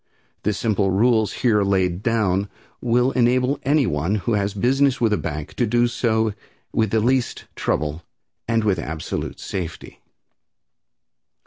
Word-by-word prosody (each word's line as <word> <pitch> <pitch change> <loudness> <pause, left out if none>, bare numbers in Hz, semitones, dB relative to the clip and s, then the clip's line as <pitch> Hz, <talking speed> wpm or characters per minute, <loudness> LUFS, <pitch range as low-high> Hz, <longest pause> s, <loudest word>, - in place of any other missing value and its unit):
The 105 - 0
simple 105 -1 0
rules 110 +1 +3
here 110 -4 +4
laid 95 -2 +1
down 100 -4 +1 0.3
will 125 +2 +2
enable 130 +2 +2
anyone 110 - +1
who 110 +3 -1
has 100 -1 0
business 130 +5 +2
with 115 -3 +2
a - - +2
bank 75 -3 -5
to 120 - +2
do 120 +2 +3
so 110 -2 0 0.4
with 110 -2 +1
the 110 - +2
least 125 +3 0
trouble 75 +2 -1 0.5
and 115 -1 +1
with 100 -4 +1
absolute 80 -1 -4
safety. 90 -3 -6
110 Hz, 135 wpm, -22 LUFS, 95-120 Hz, 0.5 s, here